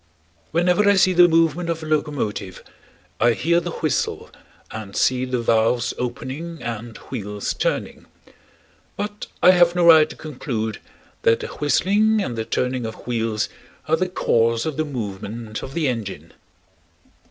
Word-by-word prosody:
Whenever 180 +5 +3
I 200 - +5
see 185 -1 +4
the 175 0 +7
movement 165 0 +2
of 165 -1 -2
a - - -5
locomotive 145 -11 -2 0.6
I 120 +1 +4
hear 170 +9 +2
the 175 0 -5
whistle 155 -3 -2 0.4
and 105 -3 -7
see 130 0 +2
the 125 -1 -1
valves 115 +1 +2
opening 135 +7 -5
and 115 -1 -5
wheels 105 -5 -3
turning; - - -3 0.9
but 205 0 -5 0.2
I 180 - +9
have 175 -1 +4
no 175 -1 +3
right 160 -2 +7
to - - -9
conclude 115 -7 -4 0.4
that 115 - +3
the - - -4
whistling 205 +9 +2
and 155 - -2
the 110 -1 -3
turning 125 -1 -1
of 110 - -9
wheels 115 -3 -1 0.4
are 160 - +3
the 185 +3 -1
cause 115 -8 +1
of 155 -3 -2
the 155 - -1
movement 110 -3 -5
of 135 - -8
the 165 -4 +1
engine. 115 -6 -4
130 Hz, 155 wpm, -22 LUFS, 115-170 Hz, 0.9 s, I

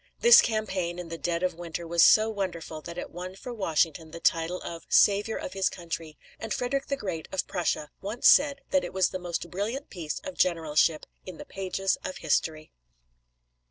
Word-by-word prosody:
This 475 0 +9
campaign, 190 -6 -2
in 175 -2 -7
the 165 - -5
dead 170 +3 -1
of 180 -1 +1
winter, 170 0 -6
was 170 0 +4
so 215 0 +7
wonderful 175 -7 -4
that 170 +2 -9
it - - -6
won 180 +2 -7
for 245 +5 -8
Washington 165 -5 0
the 170 - -9
title 165 +2 +1
of 170 -1 -7
"Savior 205 +2 +4
of - - -6
his 195 -1 +1
Country," 165 -3 -7 0.2
and 225 - -6
Frederick 270 +2 -1
the 275 - -1
Great 170 -8 -5
of 190 - -1
Prussia 170 -4 -2
once 215 +5 +1
said 280 0 +5
that 280 -1 +3
it - - -6
was 190 -1 +2
the 185 - -5
most 175 -1 -4
brilliant 225 +9 -4
piece 165 -5 -4
of 285 -2 -8
generalship 160 -2 +2 0.2
in 185 -3 -7
the - - -9
pages 195 0 -2
of 185 - -5
history. 155 0 -1
180 Hz, 195 wpm, -27 LUFS, 165-210 Hz, 0.2 s, This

